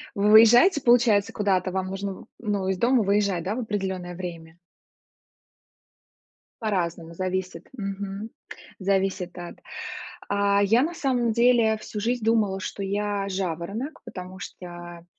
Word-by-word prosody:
Вы 205 +1 +3
уезжаете, 240 - +7
получается, 235 -6 +4
куда-то? 190 -3 +1
Вам 190 0 -2
нужно 195 +1 -4
в - - -12
ну, 205 -4 -2
из 190 -1 0
дома 240 +3 +3
выезжать, 200 -3 +1
да, 200 +4 -2
в 250 - -2
определённое 190 -5 -3
время? 170 -2 -8 2.0
По-разному, 170 -6 -2
зависит, 185 -1 -3
мгм. 200 0 -5 0.5
Зависит 190 -2 -1
от 175 0 -8 0.7
А, 200 0 +2
я 225 +5 +4
на 335 +3 -2
самом 250 -7 0
деле 235 -2 +4
всю 215 0 -7
жизнь 235 +2 -1
думала, 215 -4 +2
что 200 - -5
я- 200 0 -1
жаворонок, 190 - -4
потому 185 0 -8
что 175 -2 -9
200 Hz, 130 wpm, -25 LUFS, 185-220 Hz, 2.0 s, уезжаете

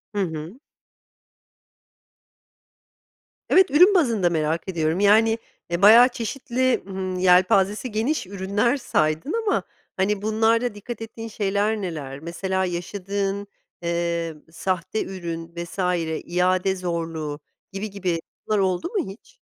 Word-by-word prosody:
Hı 200 - +1
hı. 165 - -5 2.9
Evet, 375 -3 +5
ürün 360 +7 +7
bazında 230 - +3
merak 160 +1 -1
ediyorum, 165 0 0
yani, 220 +2 +5 0.3
e, 170 +2 -1
bayağı 230 +5 +9
çeşitli, 255 +1 -1
hımm, 190 -1 -4
yelpazesi 190 +5 +3
geniş 225 0 -1
ürünler 200 +7 0
saydın 155 - 0
ama, - - +2 0.3
hani, 195 +1 +1
bunlarda 225 +2 +1
dikkat 225 +3 -7
ettiğin 225 0 -7
şeyler 205 0 0
neler? 145 -7 -5
Mesela 190 +3 -2
yaşadığın, 195 +3 -3 0.3
eee, 170 -1 -1 0.2
sahte 185 +4 -2
ürün 170 -3 -6
vs. 170 +3 -7 0.5
iade 185 +2 +1
zorluğu 165 -4 -3 0.3
gibi, 200 +2 -4
gibi 185 -4 -2 0.3
bunlar 215 -1 +2
oldu 185 - 0
mu 395 -3 -2
hiç? - - -17
195 Hz, 115 wpm, -23 LUFS, 170-220 Hz, 2.9 s, bayağı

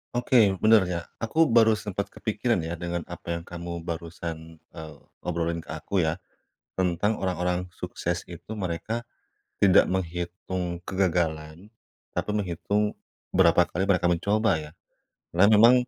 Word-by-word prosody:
Oke 120 +1 0 0.2
bener 110 -2 +6
ya, 85 -1 -2 0.2
aku 160 +8 +3
baru 110 -1 +7
sempat 105 -2 -3
kepikiran 110 0 -1
ya 85 - -3
dengan 85 0 -3
apa 85 -1 -7
yang 85 - -14
kamu 85 0 -6
barusan, 80 -1 -6
eee, 80 -1 -11 0.3
obrolin 85 -1 -2
ke - - -10
aku 85 +4 -1
ya, 80 +3 -1 0.6
tentang 95 +4 +1
orang-orang 90 -1 -1
sukses - - -3
itu - - -10
mereka 105 +3 -3 0.6
tidak 95 -2 +5
menghitung 90 0 -3
kegagalan 85 0 -1 0.4
tapi - - -2
menghitung 105 +2 0 0.4
berapa 90 -2 +5
kali 95 +3 -2
mereka 90 -3 +2
mencoba 100 +6 +2
ya, 75 -1 -9 0.7
karena 90 - +6
memang 115 +4 +8
90 Hz, 130 wpm, -26 LUFS, 85-105 Hz, 0.7 s, memang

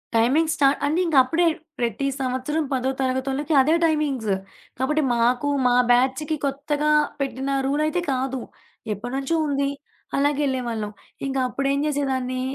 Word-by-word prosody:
Timing 285 +8 +3
స్టా 280 -2 +3 0.2
అంటే 310 +5 +1
ఇంకప్పుడే 320 +4 +3 0.3
ప్రతి 235 +3 -1
సంవత్సరం 260 +4 -1
పదో 260 0 0
తరగతొళ్ళకి 265 +4 -1
అదే 310 +5 +3
టైమింగ్స్. 280 -10 0 0.4
కాబట్టి, 300 +4 +1
మాకు 245 +4 +2 0.2
మా 245 - +3 0.2
బ్యాచ్‌కి 260 +5 +2
కొత్తగా 290 +2 -1 0.3
పెట్టిన 275 0 -2
రూలయితే 305 +5 0
కాదు. 265 0 -1 0.5
ఎప్పడినుంచో 265 - -3
ఉంది. 280 0 0 0.5
అలాగేళ్ళే 280 -2 +1
వాళ్ళం. 215 -2 -3 0.4
ఇంక 270 0 -2
అప్పుడేం 275 +2 -1
జేసేదాన్ని, 260 -3 -1
275 Hz, 120 wpm, -23 LUFS, 255-295 Hz, 0.5 s, Timing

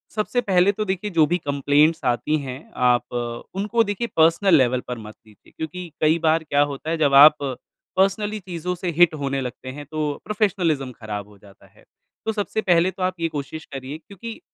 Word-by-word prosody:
सबसे 220 +3 0
पहले 190 -3 +3
तो 215 +1 -3
देखिए 190 +1 -2
जो 165 -3 +4
भी 175 - +1
कंप्लेंट्स 145 +1 +2
आती 125 +5 +1
हैं, 130 -3 -6 0.2
आप 125 -2 +1 0.4
उनको 210 +4 +1
देखिए 210 +3 -3
पर्सनल 165 +3 +5
लेवल 130 -3 +3
पर 125 -1 -4
मत 110 -1 -10
लीजिए 105 -2 -21
क्योंकि 170 +2 -6
कई 155 +2 +3
बार 160 +1 +3
क्या 145 -2 +1
होता 140 +3 -6
है, 165 - 0
जब 145 -3 +2
आप 145 +2 +9 0.6
पर्सनली 205 +3 +1
चीजों 180 -1 -4
से 180 0 -3
हिट 175 -2 +6
होने 135 0 -1
लगते 130 0 -6
हैं 145 +3 -8
तो 155 -1 -2 0.2
प्रोफ़ेशनलिज़्म 180 - 0
खराब 105 -4 -7
हो 105 -1 -18
जाता 100 0 -19
है। - - -24 0.4
तो 220 - +1
सबसे 215 0 -2
पहले 180 -2 +3
तो 190 - -6
आप 185 -1 -1
ये 165 - +1
कोशिश 155 +1 -6
करिए 135 +2 -6
क्योंकि 200 +7 -10
160 Hz, 195 wpm, -22 LUFS, 135-190 Hz, 0.6 s, आप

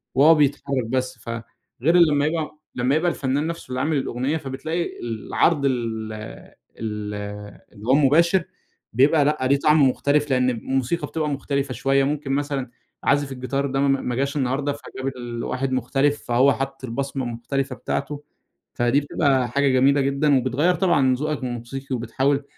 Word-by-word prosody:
وهو 150 +5 +7
بيتحرك 140 -3 +1
بس، 130 0 -2
ف 115 - -10 0.5
غير 165 +6 +3
لمّا 150 -4 +4
يبقى 155 -1 -2 0.2
لمّا 125 +3 +1
يبقى 170 +2 +2
الفنان 140 +3 -1
نَفسه 165 -5 -6
اللي 130 0 -3
عامل 155 -1 +1
الأغنية، 130 +4 -1
فبتلاقي 155 +5 -4
العرض 120 +6 0
ال 115 -4 -2 0.7
ال 105 -2 -4 0.6
اللي 105 +3 -11
هو 130 - +4
المباشر، 165 +6 +4 0.5
بيبقى 145 +4 +4
لأ 150 +1 +2
ليه 140 +1 +3
طعم 150 -2 +5
مختلف، 145 +3 +1
لأن 125 0 +3
الموسيقى 130 +6 -1
بتبقى 155 -2 -2
مختلفة 140 -1 -2
شوية، 135 +3 +2
ممكن 140 0 -2
مثلًا 140 -2 -1 0.3
عازف 145 -1 +2
الجيتار 135 +2 -2
ده 135 +1 -2
ما 135 -1 +2
ما 125 - -2
جاش 140 +3 -1
النهاردة، 140 +2 0
فجاب 135 -2 -7
ال 120 -1 -5
واحد 130 +1 -2
مختلف، 135 +3 +1
فهو 130 +4 +3
حطّ 135 0 -5
البصمة 135 +2 -3
المختلفة 130 +3 -3
بتاعته، 145 +3 -4 0.5
فدي 120 +4 +2
بتبقى 140 -3 +1
حاجة 140 +3 +1
جميلة 135 +2 +4
جدًا، 140 +1 +2
وبتغيّر 135 +8 +1
طبعًا 175 -4 +2
من 130 -1 +4
ذوقك 150 +2 -2
الموسيقي، 125 +2 -4
وبتحاول 135 +4 0
135 Hz, 160 wpm, -23 LUFS, 130-145 Hz, 0.7 s, وهو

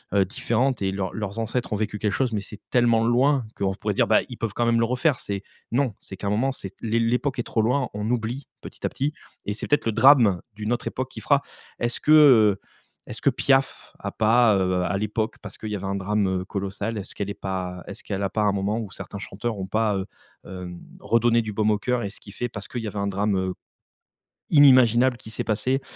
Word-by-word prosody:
heu, 100 -1 +4
différentes 120 +6 0
et 95 -1 0
leurs 95 -1 -3
leurs 105 -1 -4
ancêtres 115 +1 -2
ont - - +2
vécu 105 0 -2
quelque 105 0 0
chose, 125 +2 0
mais 105 - -1
c'est 105 +1 -11
tellement 120 -2 +3
loin 130 +2 +3
qu'on 95 -1 -1
pourrait - - -2
se - - -12
dire, - - +3
ben, - - +4
ils - - -8
peuvent 115 -3 -3
quand 120 - +1
même 115 0 +3
le 115 - +3
refaire. 125 +3 +1
C'est 100 -1 -4 0.3
non, 125 -1 +1
c'est 95 - -10
qu'à 100 - -7
un - - +1
moment, 125 +6 +1
c'est 100 -7 -6
l'é 115 0 0
l'époque 125 +4 0
est - - 0
trop 115 - 0
loin, 125 +4 +1
on 105 +1 -3
oublie 120 +3 -2
petit - - -12
à - - +1
petit 145 +3 -2 0.3
et 105 - -1
c'est 105 - -6
peut-être 145 - +2
le 115 - +2
drame, 120 -9 +6
d'une 105 +2 -2
autre 120 - -3
époque 130 0 -3
qui - - -8
fera. 140 -1 +2 0.4
Est-ce 120 0 -1
que, 150 - +1
heu, 120 -10 +7 0.5
est-ce - - -6
que - - +4
Piaf 135 -1 +1
a - - -4
pas, 110 0 +4
heu, 90 -1 +1
à 90 +3 0
l'époque, 110 +2 -2
parce - - -8
qu'il 110 - -5
y 105 - -2
avait 100 - -6
un 100 - -2
drame, 100 +1 0
heu, 95 -1 -1
colossal, 100 +3 -4
est-ce 100 - -5
qu'elle 100 -1 -3
est - - -3
pas 90 -2 -4
est-ce 100 - -8
qu'elle 100 -1 -3
a 100 - 0
pas, 110 - 0
un 105 -1 +2
moment 100 +3 -1
ou 110 -4 -5
certains 100 - -7
chanteurs 110 +3 -4
ont 95 - -4
pas, 110 0 +1
heu, 95 0 -4 0.4
hem, 90 -2 -8 0.2
redonné 115 +2 +3
du 110 -1 -5
baume 110 +1 +1
au 105 - +2
cœur 125 +2 0
et 100 - -3
ce 105 - -11
qui 100 - -13
fait, 120 +4 -4
parce 105 -3 -6
qu'il 120 - -5
y - - -3
avait 105 - -6
un 100 - -1
drame 95 -2 0 1.0
inimaginable 130 -4 +6
qui 110 0 -11
s'est - - -3
passé, 125 +5 0
110 Hz, 245 wpm, -24 LUFS, 100-120 Hz, 1.0 s, heu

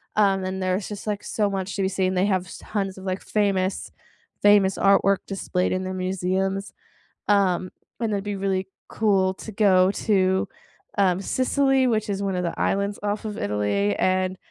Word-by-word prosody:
Um, 195 -2 +3
and 190 +1 -3
there's 185 +1 -1
just, 210 0 -7
like, 205 -1 -2
so 210 -2 0
much 195 0 -3
to 200 - -1
be 190 - +1
seen, 185 -1 0
they 185 +2 +2
have 185 -2 0
s - - -10
tons 195 -3 -3
of, - - -11
like, 185 0 -2
famous 195 -2 0 0.5
famous 205 -2 +5
artwork 195 0 +4
displayed 185 -2 -1
in 185 0 -1
the 185 - -3
museums. 190 +1 -1 0.6
Um, 185 -3 +2 0.3
and 225 - 0
it'd 200 -1 -1
be 205 -1 -2
really 190 -1 -1 0.2
cool 195 -3 +2
to 220 - -9
go 190 -3 +4
to, 190 -3 +1 0.5
um, 190 -2 +2
Sicily, 265 +3 +2
which 215 -2 0
is 200 0 -2
one 195 -2 -1
of 180 - -1
the 170 - -3
islands 200 +1 0
off 205 +1 -2
of 210 -1 -4
Italy. 100 0 0
And, 185 0 0
195 Hz, 180 wpm, -24 LUFS, 185-205 Hz, 0.6 s, famous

